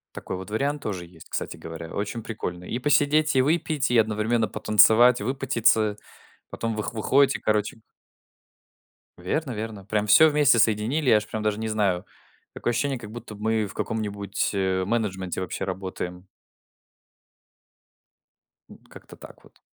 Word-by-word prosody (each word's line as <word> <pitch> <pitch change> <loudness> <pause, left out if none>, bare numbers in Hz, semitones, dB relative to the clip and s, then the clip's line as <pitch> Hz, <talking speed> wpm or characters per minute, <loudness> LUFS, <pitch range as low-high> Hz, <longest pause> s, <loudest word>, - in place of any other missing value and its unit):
Такой - - -5
вот 95 +2 -8
вариант 140 +6 -1
тоже 95 -7 -4
есть, 85 -1 -16
кстати - - -4
говоря, 80 0 -8
очень 105 +3 -3
прикольный: 90 -5 -6
и 120 - -2
посидеть, 145 +2 +2
и 130 - +5
выпить, 150 -2 0
и 120 - +3
одновременно 110 +1 +1
потанцевать, 110 +3 +5
выпотеться. 115 -4 +1 0.5
Потом 115 -1 -3
вы 105 - -3
выходите, 135 +5 +2
короче. 105 +1 0 1.4
Верно-верно, 110 - -4
прям 105 0 -1
всё 160 +10 +7
вместе 145 -5 +4
соединили, 115 +7 +1
я - - +7
аж 105 0 -1
прям 110 0 -5
даже 105 0 0
не 110 0 -3
знаю. 100 -5 0 0.5
Такое - - -2
ощущение, 135 +2 -1
как 105 -3 -10
будто 115 -1 -9
мы 110 +1 0
в 95 - -11
каком-нибудь, 100 -2 -2
э, 95 -1 0
менеджменте 95 -5 -2
вообще 95 - -4
работаем. 95 -1 -6 2.4
М, - - -13
как-то - - -14
так - - -14
вот. - - -22
110 Hz, 145 wpm, -25 LUFS, 100-125 Hz, 2.4 s, всё